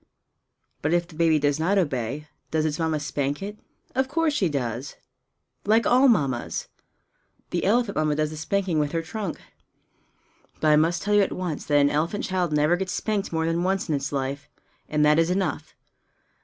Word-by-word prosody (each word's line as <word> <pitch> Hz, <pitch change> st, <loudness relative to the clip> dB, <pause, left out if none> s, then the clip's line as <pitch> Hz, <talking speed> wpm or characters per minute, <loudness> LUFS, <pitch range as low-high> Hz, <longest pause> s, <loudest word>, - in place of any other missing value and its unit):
But 150 Hz, +3 st, 0 dB
if 175 Hz, 0 st, +1 dB
the 175 Hz, -, -15 dB
baby 165 Hz, -1 st, +3 dB
does 145 Hz, 0 st, +1 dB
not 185 Hz, +6 st, +2 dB
obey, 145 Hz, -, -1 dB, 0.2 s
does 155 Hz, -1 st, 0 dB
its 155 Hz, 0 st, -1 dB
Mamma 160 Hz, -2 st, 0 dB
spank 145 Hz, +2 st, -2 dB
it? 210 Hz, +1 st, -6 dB, 0.3 s
Of 260 Hz, +1 st, +1 dB
course 315 Hz, +2 st, +1 dB
she 195 Hz, -, +1 dB
does 130 Hz, -2 st, -3 dB, 0.7 s
like 220 Hz, +3 st, +3 dB
all 255 Hz, +3 st, +5 dB
Mammas! 140 Hz, -, 0 dB, 0.8 s
The 175 Hz, -, -1 dB
elephant 220 Hz, +1 st, +2 dB
Mamma 155 Hz, -1 st, +1 dB
does 155 Hz, 0 st, 0 dB
the -, -, -6 dB
spanking 185 Hz, 0 st, 0 dB
with 150 Hz, 0 st, -1 dB
her 165 Hz, 0 st, -1 dB
trunk. 200 Hz, 0 st, -5 dB, 1.2 s
But 155 Hz, -, +2 dB
I 150 Hz, -, +6 dB
must 165 Hz, +3 st, +2 dB
tell 210 Hz, -, 0 dB
you 205 Hz, -, +6 dB
at 195 Hz, -, +1 dB
once 175 Hz, -5 st, -4 dB
that 145 Hz, -, +3 dB
an 145 Hz, 0 st, +4 dB
elephant 165 Hz, +8 st, -1 dB
child 180 Hz, -3 st, -1 dB
never 150 Hz, +3 st, +3 dB
gets 190 Hz, 0 st, -3 dB
spanked 210 Hz, -3 st, -2 dB
more 160 Hz, -1 st, 0 dB
than 165 Hz, +1 st, 0 dB
once 190 Hz, 0 st, 0 dB
in -, -, +1 dB
its 140 Hz, -1 st, -2 dB
life 140 Hz, 0 st, -3 dB, 0.4 s
and 150 Hz, -1 st, +2 dB
that 150 Hz, +1 st, +5 dB
is 165 Hz, +1 st, +2 dB
enough! 190 Hz, +1 st, -2 dB
160 Hz, 190 wpm, -25 LUFS, 150-195 Hz, 1.2 s, I